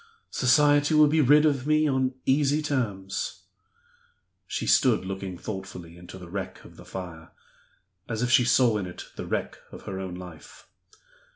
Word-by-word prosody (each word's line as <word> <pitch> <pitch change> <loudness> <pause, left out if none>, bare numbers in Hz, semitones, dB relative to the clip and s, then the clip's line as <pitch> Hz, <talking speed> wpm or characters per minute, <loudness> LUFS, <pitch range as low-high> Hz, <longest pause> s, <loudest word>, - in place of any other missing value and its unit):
Society 145 +4 +3
will 150 0 +7
be 155 +2 +3
rid 150 +3 +5
of 140 -3 +1
me 155 0 +3
on 130 -2 0
easy 145 +2 +2
terms." 105 -10 -3 1.0
She - - -3
stood 120 -7 +3
looking 95 -1 -5
thoughtfully 95 -4 -8
into 90 +2 -11
the 90 -2 -11
wreck 95 +2 -6
of - - -15
the - - -14
fire 85 -4 -8 0.8
as 115 0 -2
if 120 - 0
she 125 - +6
saw 120 -3 +3
in 95 - -4
it 90 - -9
the - - -6
wreck - - -3
of - - -11
her 95 -1 -6
own 95 -2 -5
life. 90 -4 -12
115 Hz, 165 wpm, -26 LUFS, 95-145 Hz, 1.0 s, will